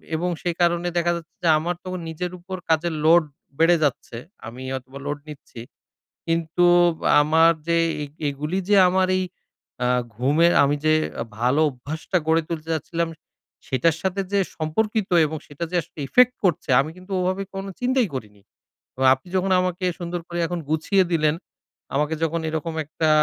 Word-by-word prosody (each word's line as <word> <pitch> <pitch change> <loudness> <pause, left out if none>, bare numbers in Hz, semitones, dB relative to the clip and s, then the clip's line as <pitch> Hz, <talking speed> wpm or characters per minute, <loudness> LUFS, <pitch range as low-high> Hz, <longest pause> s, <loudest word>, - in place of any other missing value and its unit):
এবং 175 +3 -1
সেই 175 -2 -2
কারণে 175 0 +2
দেখা 175 0 +2
যাচ্ছে 165 -2 -9
যে - - +2
আমার 175 +3 -2
তো 185 - -6 0.2
নিজের 175 +2 -4
ওপর 185 +2 -7
কাজের 160 +1 +2
load 170 +1 +6 0.4
বেড়ে 165 +2 +5
যাচ্ছে। 130 -4 -2 0.3
আমি 125 +3 -8
হয়তোবা 130 +1 -7
load 145 0 -3
নিচ্ছি, 140 -5 -11 0.7
কিন্তু 165 +1 +1 0.6
আমার 160 +2 +5 0.2
যে 170 0 +2 0.3
এই - - -5 0.2
এগুলী 150 +6 -3
যে 205 - +5
আমার 185 +1 +2
এই 185 - 0 0.6
আ - - +2 0.3
ঘুমের 150 +8 +3
আমি 140 +1 +2
যে 155 - +5 0.5
ভালো 125 +5 +2
অভ্যাসটা 145 +7 -3
গড়ে 160 0 +3
তুলতে 165 -1 -5
যাচ্ছিলাম, 165 +2 -2 0.6
সেটার 150 +5 +2
সাথে 190 +1 -1
যে 200 - +4 0.2
সম্পর্কিত 210 +7 -1 0.2
এবং 155 +1 -4
সেটা 145 +3 -7
যে - - -2
আসলে 165 -1 -15
effect 250 - +5
করছে, 175 -4 0
আমি 155 - -5
কিন্তু 185 +2 -14
ওভাবে 185 +2 -1
কোনো 195 0 -5
চিন্তাই 250 -1 +2
করিনি। 105 -5 -8 0.5
এবং 130 - 0
আপনি 130 - -21
যখন 190 +1 0
আমাকে 185 0 -2
সুন্দর 175 0 -4
করে 175 - -5
এখন 175 0 -3
গুছিয়ে 160 +5 +2
দিলেন, 155 -2 +2 0.6
আমাকে 150 +2 +1
যখন 165 +1 0
এরকম 160 +1 -3
একটা 155 +1 -1
165 Hz, 165 wpm, -23 LUFS, 150-180 Hz, 0.7 s, load